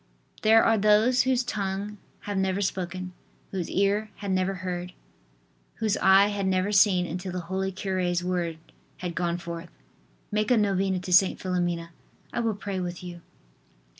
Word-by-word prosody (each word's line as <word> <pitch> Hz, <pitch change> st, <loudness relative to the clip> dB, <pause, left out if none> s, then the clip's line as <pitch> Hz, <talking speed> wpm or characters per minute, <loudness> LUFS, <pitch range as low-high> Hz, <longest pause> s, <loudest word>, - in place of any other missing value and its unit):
There 225 Hz, +1 st, +6 dB
are 225 Hz, -1 st, +3 dB
those 215 Hz, +5 st, +4 dB
whose 255 Hz, -1 st, +2 dB
tongue 205 Hz, -2 st, -3 dB, 0.2 s
had 205 Hz, -, -4 dB
never 190 Hz, 0 st, 0 dB
spoken, 185 Hz, -2 st, -3 dB, 0.4 s
whose 185 Hz, -3 st, -3 dB
ear 200 Hz, +2 st, +1 dB
had 200 Hz, -2 st, -4 dB
never 185 Hz, +1 st, +1 dB
heard, 180 Hz, -1 st, -5 dB, 0.8 s
whose 220 Hz, -2 st, 0 dB
eye 195 Hz, +1 st, +6 dB
had 200 Hz, -2 st, -2 dB
never 190 Hz, +2 st, +1 dB
seen 190 Hz, -3 st, +4 dB
until 180 Hz, +2 st, -5 dB
the 180 Hz, 0 st, -3 dB
holy 190 Hz, +3 st, -2 dB
cure's 185 Hz, -2 st, -1 dB
word 175 Hz, -3 st, -1 dB, 0.4 s
had 180 Hz, -1 st, -4 dB
gone 170 Hz, 0 st, -1 dB
forth: 170 Hz, -1 st, -7 dB, 0.6 s
"Make 215 Hz, +2 st, 0 dB
a 250 Hz, -, +5 dB
novena 195 Hz, -2 st, +1 dB
to 180 Hz, 0 st, -3 dB
St. 185 Hz, +1 st, +5 dB
Philomena; 175 Hz, -2 st, -2 dB, 0.4 s
I -, -, -1 dB
will 225 Hz, -3 st, 0 dB
pray 200 Hz, -2 st, -4 dB
with 175 Hz, 0 st, -5 dB
you." 175 Hz, -1 st, -8 dB
190 Hz, 160 wpm, -26 LUFS, 180-205 Hz, 0.8 s, There